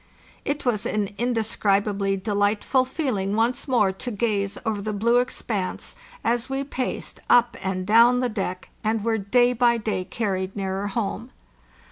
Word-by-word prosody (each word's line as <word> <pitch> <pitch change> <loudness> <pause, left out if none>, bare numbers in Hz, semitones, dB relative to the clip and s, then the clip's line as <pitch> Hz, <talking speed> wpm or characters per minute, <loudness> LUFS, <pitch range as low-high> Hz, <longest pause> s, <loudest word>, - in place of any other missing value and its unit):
It 285 -1 -2
was 220 -4 +1
an 205 -2 -1
indescribably 205 -4 +1
delightful 205 +5 +1
feeling 240 - -1
once 235 +5 0
more 225 -7 +3
to 190 +6 -6
gaze 205 -3 -1
over 215 -2 -1
the 215 +1 -3
blue 235 +4 +3
ex 250 - -5
panse, 195 -5 -3 0.3
as 240 +2 0
we 270 +1 -1
paced 260 -2 -4
up 240 -1 +5
and 185 -1 -2
down 235 +4 +6
the 250 - +1
deck, 195 -5 -4
and 220 -1 0
were 225 -1 +1
day 245 +5 +3
by 240 0 +3
day 215 -4 -2
carried 190 -2 -2
nearer 195 0 -2
home. 225 +3 -3
220 Hz, 155 wpm, -24 LUFS, 200-240 Hz, 0.3 s, down